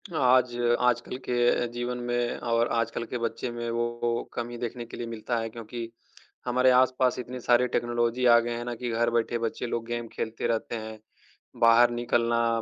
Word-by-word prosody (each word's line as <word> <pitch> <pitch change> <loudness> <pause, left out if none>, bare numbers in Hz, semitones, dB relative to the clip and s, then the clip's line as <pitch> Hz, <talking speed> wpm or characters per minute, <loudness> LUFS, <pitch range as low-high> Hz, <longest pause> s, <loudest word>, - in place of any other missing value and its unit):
आज 125 -3 +3 0.3
आजकल 125 +1 +1
के 120 0 +2
जीवन 120 +1 -3
में 120 0 -1
और 115 0 +1
आजकल 115 0 -1
के 125 - -4
बच्चे 120 +1 -3
में 120 0 -4
वो 120 0 -1
कमी 120 0 -4
देखने 120 0 -5
के 115 - -10
लिए 120 - -4
मिलता 115 +1 -3
है 115 - -3
क्योंकि 115 0 -7 0.6
हमारे 125 +1 +4
आस-पास 130 0 +3
इतनी 125 +1 -6
सारी 125 +1 +3
टेक्नोलॉज़ी 120 +1 0
आ 120 -1 +7
गए 120 0 -3
हैं 120 - -5
ना, 120 - -4
कि 120 +1 -4
घर 115 +1 +1
बैठे 120 0 0
बच्चे 115 +1 -3
लोग 115 -1 -3
गेम 120 0 -3
खेलते 110 0 -3
रहते 115 +1 -1
हैं। 110 -1 -7 0.6
बाहर 115 +1 +6
निकलना 115 -1 +1
120 Hz, 180 wpm, -27 LUFS, 115-120 Hz, 0.6 s, आ